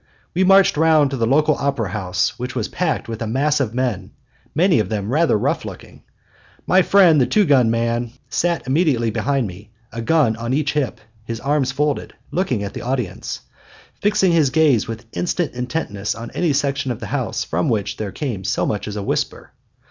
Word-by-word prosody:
We 185 +3 +2
marched 195 -3 +5
round 155 -3 +4
to - - -1
the 115 -2 +1
local 150 +4 +3
opera 140 -8 -1
house, 90 -1 -1
which 125 +1 -5
was 115 -4 -1
packed 175 -9 -2
with 115 -1 -6
a 115 - -2
mass 145 +6 +1
of 120 -4 -2
men, 110 -6 -2 0.4
many 170 - +4
of 105 -3 -1
them 105 -1 -2
rather 160 -6 +3
rough - - -1
looking. - - -10 0.6
My 185 +1 +5
friend 180 -6 +5
the 125 - +3
two 210 -2 +3
gun 130 -7 +4
man 115 +1 0 0.2
sat 170 -1 -1
immediately 130 -5 +1
behind 135 +3 0
me, 100 +2 -9 0.2
a 115 - -5
gun 135 -3 +2
on 115 +3 -2
each 145 0 0
hip, 145 -6 -1 0.2
his 115 0 -5
arms 140 -1 0
folded, 145 +1 -1 0.2
looking 135 - -1
at 100 - -5
the - - -6
audience; 125 -6 -3 0.6
fixing 205 -3 +3
his 160 -5 +3
gaze 150 -7 +3
with 115 +1 -6
instant 175 -3 -1
intentness 125 -5 -3
on 115 0 -8
any 175 -3 0
section 140 -1 0
of 120 - -3
the - - -6
house - - -1
from 85 +2 -1
which 110 -4 -1
there 105 -2 -4
came 120 -11 -4
so - - 0
much 105 -1 -2
as 105 - -5
a 105 - -3
whisper. - - -3
130 Hz, 195 wpm, -20 LUFS, 115-155 Hz, 0.6 s, marched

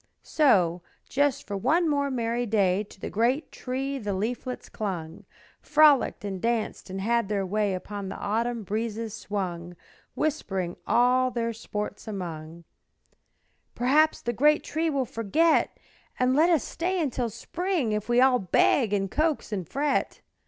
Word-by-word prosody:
So, 180 - +3 0.3
just 285 -1 +1
for 205 - -4
one 310 - +2
more 285 -2 +1
merry 240 -1 -1
day 200 -2 +2
To 200 - -17
the - - -6
great 250 +8 0
Tree 270 +2 -3
the 205 -4 -3
leaflets 245 +5 -4
clung, 190 -2 -5 0.4
Frolicked 295 -8 +4
and 190 -2 -4
danced 230 -4 -2
and 190 +1 -5
had 230 +1 +1
their 200 -2 0
way, 205 0 0
Upon 200 +1 -6
the - - -6
autumn 230 +2 -1
breezes 220 +1 -3
swung, 180 -5 -4 0.4
Whispering 195 - -2
all 255 +1 +3
their 230 -1 -2
sports 210 -1 -6
among, 170 -5 -6 1.1
"Perhaps 300 +6 +3
the 240 - -1
great 295 +7 +3
Tree 320 +2 -1
will 275 -4 0
forget 300 +10 +1 0.4
And 255 +1 +2
let 320 +4 +5
us 325 -7 +3
stay 365 +2 -2
until 260 -6 -1
the 220 - -9
spring 350 - -2
If 210 +1 -2
we 240 0 +4
all 255 -1 +5
beg 205 +4 +2
and 195 -2 0
coax 310 -5 0
and 190 -6 -4
fret." 285 0 -1
230 Hz, 150 wpm, -26 LUFS, 200-275 Hz, 1.1 s, let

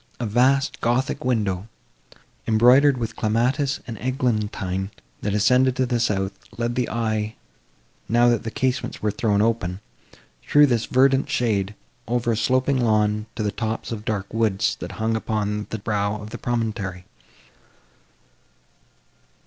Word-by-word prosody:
A 120 - -2
vast 130 +5 +2
gothic 120 +3 0
window, 105 -6 0 0.8
embroidered 125 +5 +5
with 115 -2 -4
clematis 125 +6 0
and 115 -4 -7
eglantine, 105 -7 -1 0.3
that 105 0 -1
ascended 125 +4 +3
to 130 - +1
the 120 -1 0
south, 95 -4 0 0.3
led 120 0 -1
the 125 0 -1
eye, 110 -1 -1 0.7
now 120 +1 +4
that 120 -1 +3
the 115 - -4
casements 130 0 -2
were 105 - +2
thrown 105 -1 +1
open, 100 -5 -1 0.7
through 145 0 +7
this 120 -5 0
verdant 135 +2 +3
shade, 105 -8 0 0.3
over 120 0 0
a - - +1
sloping 130 +4 +1
lawn, 105 -1 +1
to 110 - -2
the 105 - 0
tops 110 +1 -4
of 110 -2 -5
dark 105 -3 -2
woods, 110 -4 +1
that - - -6
hung 110 +1 -1
upon 105 -1 -2
the 110 - -3
brow 100 -1 -1
of 105 +1 -9
the 120 - -7
promontory. 110 -6 -3
115 Hz, 140 wpm, -23 LUFS, 105-125 Hz, 0.8 s, through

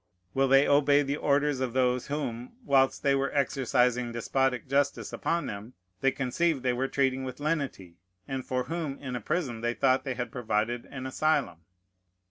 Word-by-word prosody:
will 135 0 +2
they 135 +1 +5
obey 145 0 +4
the 140 +1 -1
orders 145 -1 +1
of 130 -3 -2
those 125 -1 +1
whom, 125 -5 -4
whilst 135 -5 +3
they 140 -1 +3
were 135 0 0
exercising 125 -3 +1
despotic 125 +2 0
justice 140 +1 0
upon 170 0 -1
them, 105 +4 -7 0.3
they 135 - +3
conceived 135 +2 0
they 125 -1 +2
were 130 +2 -1
treating 135 -1 0
with 130 0 -6
lenity, 140 - -3 0.3
and 135 -1 -3
for 125 0 -1
whom 155 -2 -4
in 130 -3 -6
a 125 - -4
prison 120 - -2
they 120 0 -1
thought 130 -1 +2
they 130 -2 -3
had 125 -2 -4
provided 120 -2 -1
an 130 -1 -7
asylum? 130 - 0
130 Hz, 175 wpm, -28 LUFS, 125-140 Hz, 0.3 s, they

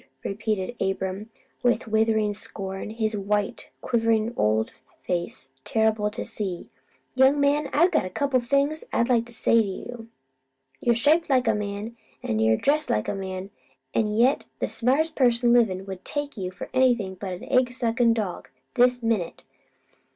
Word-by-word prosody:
repeated 210 +1 -2
Abram, 195 +2 -2 0.3
with 245 -1 +1
withering 220 -1 +2
scorn, 195 -1 -5
his 220 -1 -1
white, 205 0 -2
quivering 230 -1 +1
old 110 +1 +1 0.3
face 170 -7 -3
terrible 220 -1 +1
to 210 - -6
see. 190 -5 -5 0.4
"Young 265 +2 +4
man, 285 +1 +2
I 335 +4 +5
got 320 - +1
a - - -7
couple 275 +6 0
o' - - 0
things 280 +5 +1
to 235 -1 +2
say 230 0 +3
to 215 - -2
you. 225 +4 -7 0.7
You'r' 240 -1 +2
shaped 305 +8 +3
like 255 -3 +3
a 225 - +4
man, 210 +2 -4 0.3
an' 110 - -1
you'r' 110 0 +3
dressed 300 +2 +2
like 105 - 0
a - - -1
man, 190 0 -5 0.4
an' 220 - +2
yet 245 +5 +2
the - - -1
smartest 290 +7 +1
person 240 -2 +3
livin' 195 -6 +2
would - - -12
never - - -37
take 290 0 -2
you 190 -4 -4
for 185 - -8
anything 245 -7 +2
but 190 0 -6
an 180 - -8
egg 255 -2 +2
suckin' 235 -1 +1
dog, 205 -6 -4 0.2
this 245 0 +3
minute. 220 -7 -1
225 Hz, 165 wpm, -25 LUFS, 195-250 Hz, 0.7 s, I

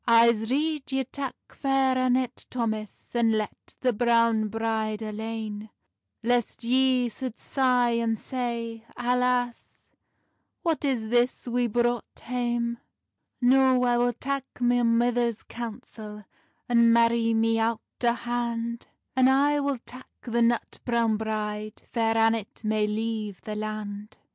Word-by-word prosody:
"I'se 230 -1 +5
rede 295 +1 -1
ye 265 0 +1
tak 270 +1 -5
Fair 270 -1 +1
Annet, 255 -1 0
Thomas, 220 -4 -4
And 230 -2 +3
let 215 -1 -4
the 250 -2 +2
browne 230 -1 +3
bride 220 0 -2
alane; 215 0 -5 0.5
Lest 240 0 0
ye 255 +1 +3
sould 245 0 -6
sigh, 250 -3 +2
and 230 -1 0
say, 235 -2 -4
Alace, 250 0 -1 0.7
What 325 -3 0
is 245 -6 0
this 245 +2 +1
we 245 0 +1
brought 240 +1 -1
hame!" 240 -1 -2 0.6
"No, 260 0 +5
I 245 -1 +3
will 245 0 +2
tak 275 +3 -3 0.2
my 245 0 +3
mither's 235 -1 +2
counsel, 220 -3 -8 0.4
And 235 -1 +5
marrie 230 0 +3
me 225 0 +2
owt 225 0 0 0.2
o 235 -1 +4
hand; 235 -1 -3 0.3
And 260 0 +5
I 285 +2 +3
will 280 -1 0
tak 255 +1 -11 0.2
the 235 -1 0
nut 235 0 +1
browne 235 -2 +2
bride, 215 -1 -3
Fair 225 -1 +1
Annet 225 -1 +1
may 215 0 +1
leive 215 -2 -3
the 215 - -5
land." 210 0 -5
235 Hz, 130 wpm, -27 LUFS, 225-250 Hz, 0.7 s, I'se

